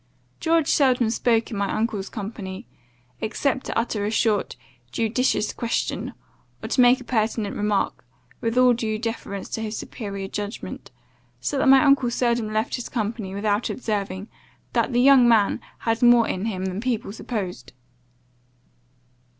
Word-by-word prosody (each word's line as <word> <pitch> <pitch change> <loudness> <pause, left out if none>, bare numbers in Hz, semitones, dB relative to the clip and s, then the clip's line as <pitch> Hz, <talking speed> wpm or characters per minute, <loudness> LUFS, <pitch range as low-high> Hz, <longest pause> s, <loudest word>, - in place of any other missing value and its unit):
George 325 -2 +2
seldom 250 -5 +3
spoke 230 0 +1
in 215 - -4
my 200 -1 -1
uncle's 215 -3 -2
company, 200 -1 -6 0.5
except 260 +4 -1
to - - -2
utter 230 -3 -1
a 205 - 0
short, 215 -2 +1 0.4
judicious 225 - 0
question, 235 -2 -2 0.5
or - - -4
to 255 - +3
make 245 +1 +6
a - - -10
pertinent 220 -3 -1
remark, 205 -7 -1 0.4
with 230 +1 -1
all 250 -1 +6
due 220 -2 -2
deference 220 -4 -4
to 225 - -3
his 215 0 -4
superior 200 -3 -6
judgment; 205 +2 -6 0.5
so - - -2
that 270 - +3
my 270 +1 +7
uncle 275 -4 +4
seldom 235 -2 0
left 220 +4 -1
his 245 - -6
company 215 -4 -3
without 205 +2 0
observing, 200 -4 -3 0.5
that - - +1
the 245 0 +3
young 265 -2 +7
man 220 -4 +3 0.2
had 225 0 0
more 240 -2 +6
in 185 +3 -2
him 190 -4 -2
than 190 +2 -3
people 235 -5 -2
supposed. 210 -5 -5
225 Hz, 150 wpm, -24 LUFS, 205-245 Hz, 0.5 s, my